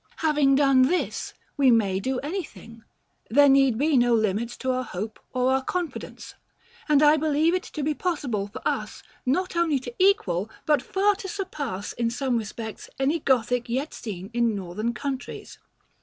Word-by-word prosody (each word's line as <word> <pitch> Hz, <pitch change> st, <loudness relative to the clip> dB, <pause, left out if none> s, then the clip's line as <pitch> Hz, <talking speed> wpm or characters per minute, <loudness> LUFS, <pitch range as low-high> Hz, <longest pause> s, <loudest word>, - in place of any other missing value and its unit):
Having 295 Hz, -3 st, +4 dB
done 275 Hz, -2 st, +4 dB
this, 345 Hz, +8 st, 0 dB, 0.2 s
we 275 Hz, -2 st, +5 dB
may 205 Hz, -5 st, +3 dB
do 260 Hz, +6 st, -2 dB
anything; 290 Hz, -, -7 dB, 0.5 s
there 285 Hz, +5 st, +6 dB
need 270 Hz, -4 st, +4 dB
be 295 Hz, +3 st, +2 dB
no 240 Hz, -1 st, +4 dB
limits 220 Hz, +2 st, -1 dB
to 260 Hz, -, -1 dB
our 255 Hz, 0 st, 0 dB
hope 215 Hz, 0 st, -6 dB
or 255 Hz, 0 st, +1 dB
our 265 Hz, 0 st, +1 dB
confidence; 355 Hz, +3 st, -5 dB, 0.6 s
and 300 Hz, 0 st, +5 dB
I 300 Hz, +1 st, +6 dB
believe 310 Hz, +2 st, +2 dB
it 370 Hz, -, +1 dB
to 305 Hz, -, -6 dB
be 305 Hz, +2 st, +1 dB
possible 280 Hz, -, -2 dB
for 225 Hz, +5 st, -5 dB
us, -, -, -3 dB, 0.2 s
not 365 Hz, +8 st, 0 dB
only 335 Hz, -4 st, +2 dB
to 245 Hz, -2 st, -7 dB
equal, 220 Hz, -, +2 dB, 0.2 s
but 300 Hz, -4 st, +3 dB
far 400 Hz, +7 st, +2 dB
to 390 Hz, -, -7 dB
surpass, 300 Hz, -, -4 dB
in 235 Hz, -1 st, -1 dB
some 245 Hz, +1 st, -1 dB
respects, 220 Hz, 0 st, -7 dB
any 280 Hz, +5 st, +1 dB
Gothic 245 Hz, -3 st, +1 dB
yet 265 Hz, +6 st, -2 dB
seen 195 Hz, -2 st, -7 dB
in 235 Hz, -2 st, +1 dB
Northern 205 Hz, +5 st, -3 dB
countries. 275 Hz, -2 st, -6 dB
265 Hz, 170 wpm, -25 LUFS, 230-300 Hz, 0.6 s, there